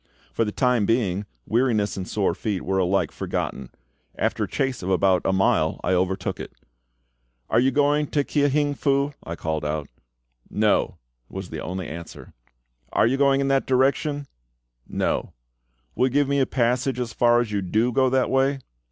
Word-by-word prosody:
For - - +1
the 105 - -2
time 125 -4 +1
being 105 -4 0 0.2
weariness 115 -3 +1
and 95 -2 -5
sore 105 -3 0
feet 100 -4 -3
were 95 +1 0
alike 95 +2 +1
forgotten. 65 -2 -4 0.5
After - - 0
a - - -11
chase 135 -2 -2
of 90 - -4
about 95 -1 +3
a - - +2
mile 95 0 +2
I 95 - +1
overtook 95 +1 -1
it. - - -7 1.0
"Are - - +4
you 130 +2 +4
going 145 +2 +2
to 145 0 0
Kia 145 0 +1
hing 145 +1 +1
Fu?" 140 0 0
I 85 - -5
called 80 -2 -3
out. 75 -1 -2 0.6
"No," - - +1 0.3
was 95 -2 -7
the - - -5
only 95 -1 -4
answer. 85 +2 -9 0.6
"Are - - +3
you 120 +3 +2
going 140 0 +3
in 135 - 0
that 135 0 +1
direction?" 140 +3 +1 0.6
"No." - - -2 0.6
"Will 130 - +2
you 130 - -5
give 145 0 +3
me 140 0 +1
a 130 - +2
passage 125 +1 0
as 120 -3 -3
far 120 +1 +4
as 120 -3 -2
you 100 -1 0
do 110 +6 +1
go 130 +2 +3
that 130 0 +1
way?" 135 +1 +2
120 Hz, 180 wpm, -24 LUFS, 95-135 Hz, 1.0 s, Are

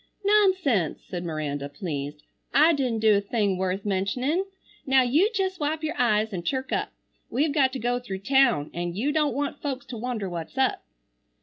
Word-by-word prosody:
"Nonsense!" 375 - +2
said 175 -1 -5
Miranda, 150 -4 -3
pleased. 150 -3 -5 0.3
"I 315 +4 +6
didn't 250 -6 -1
do 215 -1 +5
a - - +1
thing 205 -1 0
worth 190 +2 -2
mentioning. 250 - 0 0.4
Now 265 -2 +4
you 300 - +3
jest 380 -4 -1
wipe 310 +1 -1
your 310 - -1
eyes 220 -3 +2
and 175 -2 -3
chirk 260 +7 -2
up. - - -1 0.4
We've 285 +3 +1
got 270 -4 +3
to - - -2
go 245 0 0
through 195 -6 -6
town 240 - +3
an' 175 0 -3
you 255 +9 0
don't 300 -4 +1
want 285 +1 -3
folks 275 -1 -4
to 250 - -7
wonder 225 -3 -3
what's 175 +6 -6
up." 265 +9 +1
245 Hz, 185 wpm, -26 LUFS, 190-285 Hz, 0.4 s, I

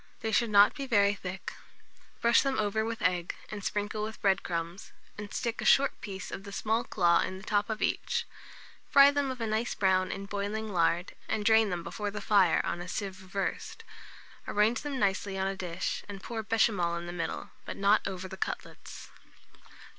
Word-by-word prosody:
They 220 - -2
should 230 +1 +2
not 205 0 +6
be 275 -1 -5
very 205 -4 +4
thick. 190 -1 -6 0.7
Brush 235 0 +5
them 275 -1 0
over 215 +1 0
with 225 0 -4
egg, 175 -1 0 0.2
and 210 -2 -6
sprinkle 205 +1 -2
with 220 +1 -5
bread 195 -2 +2
crumbs, 170 +3 -4 0.2
and 205 0 -8
stick 235 -2 -2
a - - -4
short 275 - +4
piece 195 -2 -6
of 195 - -6
the 200 - -9
small 220 +3 0
claw 175 -7 +3
in 185 - -3
the 190 - -12
top 205 0 0
of 220 -1 -2
each; - - 0 0.6
fry 280 0 +8
them 285 -1 0
of 260 -1 -5
a 230 - -1
nice 220 +2 -1
brown 185 -1 +2
in 195 - -5
boiling 205 +2 -3
lard, 170 +1 +1
and 210 - -1
drain 220 -1 +5
them 175 -2 -3
before 205 +5 -4
the 210 +1 -5
fire, 195 -5 +3
on 175 - -2
a 175 - -7
sieve 190 -1 -4
reversed; 195 +1 -4 0.6
arrange 215 +3 +2
them 290 -2 -4
nicely 195 -2 0
on 190 - 0
a 195 0 -1
dish, 180 -1 -3
and 195 -1 -8
pour 225 -2 -4
béchamel 200 -6 +2
in 170 - -6
the 175 - -6
middle, 170 -2 -4
but - - -7
not 200 +2 +4
over 190 -1 -5
the 190 - -9
cutlets. - - -6
205 Hz, 200 wpm, -30 LUFS, 190-220 Hz, 0.7 s, fry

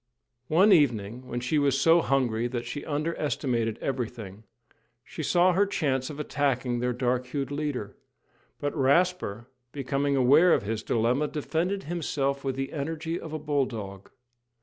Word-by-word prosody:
One 190 +6 +5
evening 125 - +1
when 120 -1 -4
she 150 +5 +1
was 140 -2 +2
so 165 +3 +5
hungry 120 -5 +1
that 120 -1 -4
she 145 +4 -5
under 155 +3 -2
estimated 120 -7 -1
everything, 110 -6 -4 0.6
she 160 - -8
saw 175 +4 +3
her 200 +3 +3
chance 135 -8 -1
of 150 -1 -8
attacking 135 -5 -1
their 125 +1 0
dark 125 0 -1
hued 140 +2 -3
leader, 145 -8 -3 0.6
but 145 - -2
Rasper, 140 - +1 0.3
becoming 140 +1 -1
aware 145 +7 +5
of - - -2
his 110 +2 -3
dilemma, 120 +7 +1
defended 170 +6 -2
himself 140 -4 -2
with 135 -2 -2
the 135 0 -3
energy 160 +3 -3
of 160 - -8
a 155 - -3
bulldog. 120 -10 -3
140 Hz, 150 wpm, -27 LUFS, 120-155 Hz, 0.6 s, One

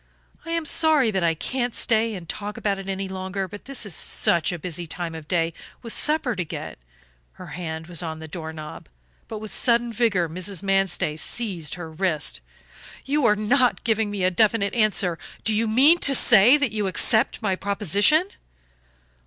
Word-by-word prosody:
I - - -6
am 330 -1 -2
sorry 305 -7 +3
that 190 -3 -1
I 165 -1 +2
can't 245 +7 -3
stay 225 -1 +1
and 175 -3 -9
talk 205 +4 -6
about 200 -2 -1
it 195 - -8
any 195 0 -3
longer, 190 +1 -4
but 205 +2 -11
this 275 -3 -5
is 200 - -6
such 160 0 +1
a 175 - -4
busy 170 +1 -4
time 165 +1 -5
of 160 -2 -9
day, 165 -2 0 0.3
with 230 - -6
supper 300 -5 +1
to 180 - -2
get 155 - -8 0.3
" - - -38
Her - - -11
hand 160 -2 -5
was 170 -1 -3
on 160 -2 -5
the 160 0 -9
door 160 0 -7
knob, 155 - -10 0.4
but 220 - -6
with 215 0 -8
sudden 235 -1 +2
vigor 205 -7 +1
Mrs. 185 +3 -3
Manstey 195 -5 0
seized 180 - -2
her 170 -2 -8
wrist. 160 -2 -1 0.6
"You 285 0 0
are 210 - +4
not 245 +4 +1
giving 220 -2 0
me 205 -2 -3
a 185 - +3
definite 205 +1 +2
answer. 205 -6 +1 0.2
Do 220 - 0
you 225 +2 +1
mean 275 +10 +5
to 275 -4 +4
say 240 +3 +6
that 285 -6 -1
you 210 -2 -2
accept 220 +5 +2
my 195 -3 +1
proposition?" 205 - +2
200 Hz, 190 wpm, -23 LUFS, 170-230 Hz, 0.6 s, say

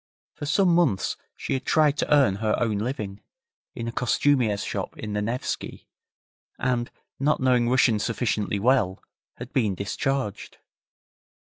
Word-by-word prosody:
For 145 - -6
some 180 +3 +3
months 155 - +2 0.2
she - - -3
had 135 0 -2
tried 150 -2 +3
to - - -1
earn 135 -10 +4
her 110 0 +1
own 110 -4 0
living, 105 -4 -4 0.5
in 115 -1 -4
a - - -2
costumier's 120 -3 +1
shop - - -4
in 105 -1 -5
the 105 - 0
Newski, 115 +4 -4 0.7
and, 125 -2 -1 0.3
not 145 +3 +2
knowing 125 -2 +3
Russian 125 -4 +3
sufficiently 105 -2 -1
well, 105 -4 +2 0.3
had - - -9
been 110 -7 +1
discharged. 105 +3 -3
120 Hz, 140 wpm, -25 LUFS, 105-135 Hz, 0.7 s, earn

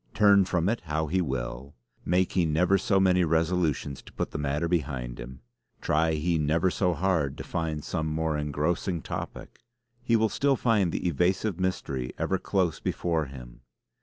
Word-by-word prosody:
Turn 100 -2 +6
from 90 -1 0
it 115 +3 0
how 80 0 -1
he 90 +5 0
will; 65 -2 -4 0.3
make 90 +2 +1
he 90 - +2
never 85 +5 +3
so 95 +1 +2
many 90 -1 +4
resolutions 80 -3 0
to - - -16
put - - -3
the - - -4
matter 75 +3 -1
behind 65 -8 -2
him; 65 +2 -9 0.4
try 80 +1 +1
he 80 +2 0
never 80 +5 +2
so 90 -2 +1
hard 80 -5 0
to - - -6
find 80 -3 -3
some 80 0 -2
more 80 0 -1
engrossing 75 +4 -1
topic, - - -6 0.4
he 120 -1 +2
will 110 0 +3
still 140 +3 +2
find 110 -8 +2
the - - -2
evasive 90 +4 0
mystery 70 -9 -2
ever 95 - 0
close 90 -5 0
before 80 -3 -1
him. 60 -3 -11
80 Hz, 170 wpm, -27 LUFS, 75-95 Hz, 0.4 s, Turn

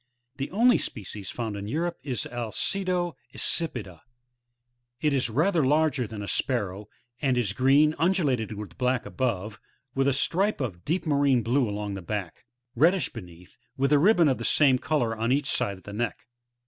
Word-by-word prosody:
The 135 0 -3
only 240 +6 +4
species 100 -3 -5
found 115 -3 -4
in 100 0 -5
Europe 170 +8 -2
is 130 -2 -3
the - - -8
Akedo 175 - -1 0.2
ispida^^M 115 - -2 1.0
is 140 -5 +1
rather 160 - +2
larger 145 -2 +2
than 105 -1 -7
a - - -6
Sparrow, 105 -6 -1 0.3
and 130 -3 +1
is 105 -5 0
green, 140 +6 +4
undulated 145 - +1
with 100 -6 -9
black 125 0 +1
above, 110 -4 -2 0.3
with. 135 0 +1
a 140 - +3
stripe 190 +9 +1
of 100 -11 -4
deep 175 +5 -1
marine 140 -5 +3
blue 120 +1 +1
along 105 0 -4
the 95 - -5
back; 95 -2 -5 0.3
reddish 170 +8 +3
beneath, 90 0 -12 0.2
with 140 +2 +2
a 145 - +6
ribbon 175 -1 +5
of 130 -4 +1
the - - -4
same 135 0 +4
colour 125 -7 0
on 115 +2 -1
each 140 +2 +2
side 100 -8 0
of 95 - -18
the 105 - -9
neck. 120 +3 -3
130 Hz, 175 wpm, -26 LUFS, 105-150 Hz, 1.0 s, a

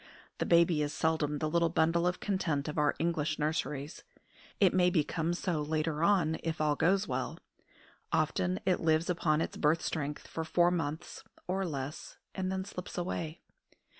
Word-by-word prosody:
The - - -1
baby 170 -2 +4
is 145 0 -1
seldom 155 -2 0
the 155 - -1
little 170 +1 +2
bundle 165 +1 +2
of 180 - -1
content 165 -8 -1
of 150 0 -2
our 150 -1 +2
English 155 -2 0
nurseries. 150 -1 -2 0.6
It 190 -4 +5
may 180 -1 +4
become 165 0 0
so 175 -4 -1
later 155 +1 -1
on, 170 -5 +3
if 165 -1 -3
all 150 -1 +2
goes 190 +6 +2
well. 130 -2 -3 0.7
Often 90 0 +1
it 185 -1 +2
lives 160 +2 +2
upon 160 -2 +1
its - - -3
birth 155 +2 +2
strength 150 -2 -3
for 160 - -4
four 175 +2 +3
months, 160 -2 -3 0.2
or 190 +1 -1
less, 140 -1 -5 0.2
and 185 -1 -2
then 190 0 -2
slips 180 -2 -7
away. 170 -2 -3
160 Hz, 165 wpm, -31 LUFS, 150-175 Hz, 0.7 s, It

